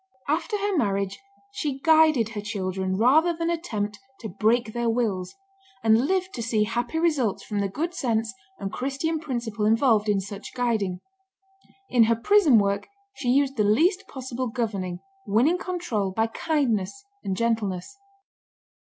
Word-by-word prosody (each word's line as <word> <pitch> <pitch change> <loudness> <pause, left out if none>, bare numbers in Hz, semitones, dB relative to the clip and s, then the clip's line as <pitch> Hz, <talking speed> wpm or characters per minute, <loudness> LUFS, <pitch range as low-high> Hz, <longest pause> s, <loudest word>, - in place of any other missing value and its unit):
After 340 +9 0
her 405 -1 -1
marriage 200 - 0 0.3
she 295 -8 -3
guided 310 -5 +4
her 215 -2 -5
children 190 -2 -2
rather 305 - +4
than 335 0 0
attempt 215 -11 -3 0.2
"to 220 - -5
break 220 +4 +1
their 235 -1 0
wills," 215 - -1 0.5
and 225 +4 +4
lived 375 +1 0
to 235 - -4
see 225 -2 +1
happy 240 +7 -2
results 300 - +1
from 210 -2 -3
the 200 -1 0
good 325 - -3
sense 230 -7 -1 0.2
and 195 +1 -5
Christian 275 +6 -2
principle 235 -7 -3
involved 220 -1 +3
in 205 -1 +2
such 200 +4 -8
guiding. 215 -7 -1 0.9
In 240 -3 +5
her 230 +1 +3
prison 300 - +5
work 200 -1 +1 0.3
she 260 -10 -3
used 275 +1 +2
the 210 - +3
least 330 - +2
possible 260 -1 -4
governing, 200 -7 -3 0.3
winning 255 - +3
control 345 - -2
by 220 +4 +1
kindness 265 - -1 0.2
and 190 -1 -2
gentleness. 225 - -1
235 Hz, 150 wpm, -25 LUFS, 210-295 Hz, 0.9 s, In